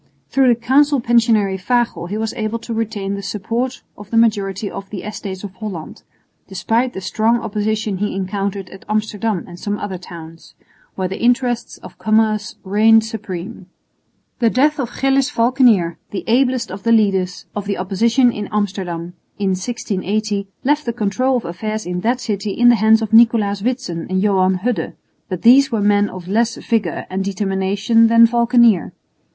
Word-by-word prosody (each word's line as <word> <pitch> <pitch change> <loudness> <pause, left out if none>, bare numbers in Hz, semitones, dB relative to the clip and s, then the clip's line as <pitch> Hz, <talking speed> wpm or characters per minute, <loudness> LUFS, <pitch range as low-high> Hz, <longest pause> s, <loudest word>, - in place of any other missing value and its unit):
Through 270 -1 +3
the 235 -2 +3
Council 280 +4 +3
Pensionary 225 -5 +2
Fagel 235 -3 0
he 205 +4 -4
was 220 0 -2
able 220 +1 -3
to 230 0 -7
retain 215 -3 -3
the 200 - -4
support 230 +6 -3
of 205 0 -12
the 230 - 0
majority 205 -3 +1
in 195 - -6
the 195 -2 -6
Estates 200 -2 -6
of 200 -2 -7
Holland, 185 -4 -7 0.5
despite 230 +6 -1
the 190 - -6
strong 220 +5 +1
opposition 215 -1 -2
he 205 -1 -2
encountered 195 0 -3
at 190 - -12
Amsterdam 215 -2 -1
and 175 -1 -11
some 205 0 -3
other 195 -3 -5
towns, 165 -2 -12 0.4
where 185 -1 -2
the 190 - -6
interests 245 0 0
of - - -12
commerce 215 -1 +1
reigned 220 +3 +4
supreme. 195 -3 -7 0.7
The 235 -2 +3
death 295 +6 +2
of 245 -4 -2
Gillis 270 0 +2
Valckenier, 230 - +2
the 200 - -5
ablest 250 0 +1
of 190 +1 -7
the 230 - 0
leaders 195 -5 +1
of 205 -1 -4
the 200 0 -2
opposition 230 +7 +2
in 210 -3 -6
Amsterdam, 185 -5 -3 0.2
in 200 -2 0
1680 200 0 -2 0.2
left 295 +3 +1
the 235 - 0
control 245 +4 0
of 235 - -5
affairs 215 +6 -4
in 180 0 -3
that 235 +6 0
city 210 -3 -3
in 240 +3 +4
the 240 - +6
hands 220 +1 +4
of 220 0 -5
Nicolaes 225 -3 +4
Witsen 230 -8 -3
and 185 0 0
Johan 190 -2 +2
Hudde, 245 -2 -1 0.4
but 185 -3 -5
these 270 +3 +6
were 225 - 0
men 205 0 +2
of 180 -1 -9
less 225 +4 +1
vigour 215 -7 -2
and 190 +1 -2
determination 200 +3 +1
than 230 0 +6
Valckenier. 235 -4 +3
215 Hz, 170 wpm, -18 LUFS, 195-235 Hz, 0.7 s, the